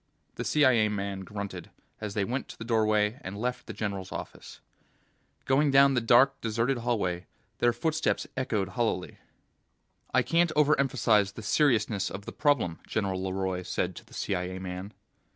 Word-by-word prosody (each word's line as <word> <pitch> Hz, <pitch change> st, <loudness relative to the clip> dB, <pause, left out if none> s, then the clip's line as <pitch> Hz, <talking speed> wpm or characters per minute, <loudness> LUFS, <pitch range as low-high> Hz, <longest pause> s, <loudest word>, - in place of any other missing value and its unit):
The -, -, -4 dB
CIA 130 Hz, -8 st, +4 dB
man 100 Hz, -1 st, -3 dB
grunted 95 Hz, -2 st, -6 dB, 0.3 s
as 105 Hz, -1 st, -5 dB
they 100 Hz, -2 st, +1 dB
went 125 Hz, +5 st, -3 dB
to -, -, -11 dB
the -, -, -7 dB
doorway 110 Hz, 0 st, +2 dB
and 95 Hz, +2 st, -6 dB
left 125 Hz, +3 st, -3 dB
the -, -, -5 dB
general's 100 Hz, -3 st, -4 dB
office. -, -, -8 dB, 0.9 s
Going 140 Hz, +2 st, +3 dB
down 140 Hz, 0 st, +6 dB
the 125 Hz, -, +2 dB
dark, 125 Hz, +4 st, +4 dB
deserted 115 Hz, +3 st, 0 dB
hallway, 95 Hz, -7 st, -1 dB, 0.3 s
their 120 Hz, -, +4 dB
footsteps 155 Hz, +7 st, 0 dB
echoed 110 Hz, -7 st, -1 dB
hollowly. 110 Hz, -6 st, -2 dB, 0.9 s
"I -, -, +3 dB
can't 170 Hz, 0 st, +2 dB
overemphasize 130 Hz, -9 st, +3 dB
the 110 Hz, -, -8 dB
seriousness 110 Hz, -6 st, +2 dB
of 100 Hz, +1 st, -7 dB
the -, -, -6 dB
problem," 130 Hz, -, +1 dB
General 95 Hz, -3 st, -1 dB
LeRoy 95 Hz, -1 st, -2 dB
said 90 Hz, 0 st, -2 dB
to -, -, -9 dB
the -, -, -16 dB
CIA 90 Hz, +1 st, -2 dB
man. 95 Hz, +1 st, -6 dB
110 Hz, 155 wpm, -28 LUFS, 95-125 Hz, 0.9 s, down